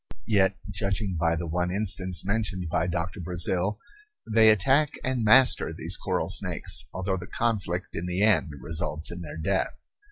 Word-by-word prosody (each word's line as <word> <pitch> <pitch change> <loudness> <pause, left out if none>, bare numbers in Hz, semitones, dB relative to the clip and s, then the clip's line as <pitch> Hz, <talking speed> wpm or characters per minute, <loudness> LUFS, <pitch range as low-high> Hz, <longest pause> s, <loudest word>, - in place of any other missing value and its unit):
Yet, 100 -3 +2
judging 100 0 -2
by 80 0 +2
the 85 +1 -4
one 90 +2 -1
instance 95 -2 0
mentioned 100 -4 -2
by 90 +1 0
Doctor 85 +3 -3
Brazil, 90 +3 0 0.5
they 110 0 +5
attack 135 +8 +3
and 130 -3 -1
master 125 +4 +5
these - - -4
coral - - -2
snakes, - - 0
although 95 +1 -2
the 90 0 -8
conflict 100 -6 -2
in 90 - -4
the 90 +3 0
end 105 -6 +3
results 80 +1 -2
in 90 +1 -7
their 80 -2 -8
death. 95 +4 -1
95 Hz, 160 wpm, -26 LUFS, 90-105 Hz, 0.5 s, they